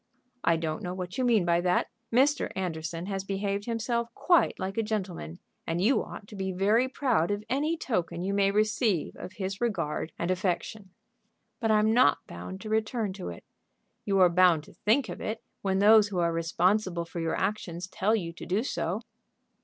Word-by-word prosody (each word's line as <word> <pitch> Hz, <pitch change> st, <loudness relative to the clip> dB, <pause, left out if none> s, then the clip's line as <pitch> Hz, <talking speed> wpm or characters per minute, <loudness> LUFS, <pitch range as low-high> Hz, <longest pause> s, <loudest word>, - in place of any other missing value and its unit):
"I 170 Hz, -, +4 dB
don't 160 Hz, -1 st, -3 dB
know 180 Hz, 0 st, -4 dB
what 180 Hz, +4 st, -5 dB
you -, -, +2 dB
mean 225 Hz, -7 st, +3 dB
by 170 Hz, 0 st, +3 dB
that. 180 Hz, 0 st, +2 dB, 0.2 s
Mr. 275 Hz, +5 st, +3 dB
Anderson 165 Hz, -2 st, -3 dB
has 195 Hz, -1 st, -3 dB
behaved 200 Hz, +1 st, -2 dB
himself 235 Hz, 0 st, -1 dB
quite 350 Hz, -2 st, +3 dB
like 190 Hz, +1 st, -4 dB
a -, -, +4 dB
gentleman, 190 Hz, -, -4 dB, 0.3 s
and 165 Hz, +1 st, -1 dB
you 225 Hz, +9 st, +3 dB
ought -, -, -9 dB
to 210 Hz, -, -10 dB
be 190 Hz, -1 st, -2 dB
very 210 Hz, +7 st, +2 dB
proud 250 Hz, -, +1 dB
of 205 Hz, +1 st, -2 dB
any 300 Hz, +5 st, +1 dB
token 180 Hz, -, -2 dB
you 195 Hz, +1 st, -1 dB
may 200 Hz, -1 st, +3 dB
receive 215 Hz, -, +1 dB
of 185 Hz, -, -8 dB
his 195 Hz, +1 st, -4 dB
regard 170 Hz, -9 st, -1 dB
and 170 Hz, +2 st, -1 dB
affection." 185 Hz, +2 st, -2 dB, 0.7 s
"But 225 Hz, -4 st, 0 dB
I'm 215 Hz, 0 st, +4 dB
not 230 Hz, -12 st, +4 dB
bound 90 Hz, -, -8 dB
to 215 Hz, -, -7 dB
return 220 Hz, -1 st, 0 dB
to 190 Hz, -1 st, -6 dB
it." 85 Hz, -, -9 dB, 0.6 s
"You 195 Hz, -1 st, +1 dB
are 180 Hz, -, +8 dB
bound 175 Hz, -3 st, +4 dB
to -, -, -16 dB
think 225 Hz, +4 st, +1 dB
of 175 Hz, -, -7 dB
it 220 Hz, +1 st, -4 dB, 0.2 s
when 190 Hz, -1 st, 0 dB
those 210 Hz, +1 st, +6 dB
who 200 Hz, -3 st, -5 dB
are 170 Hz, -1 st, +2 dB
responsible 175 Hz, +2 st, +1 dB
for 170 Hz, -, -7 dB
your 165 Hz, -1 st, -1 dB
actions 180 Hz, -4 st, -2 dB
tell 195 Hz, +3 st, +1 dB
you 170 Hz, -6 st, -3 dB
to 175 Hz, -, -9 dB
do 195 Hz, +5 st, +1 dB
so." 200 Hz, -5 st, -2 dB
195 Hz, 190 wpm, -28 LUFS, 175-220 Hz, 0.7 s, are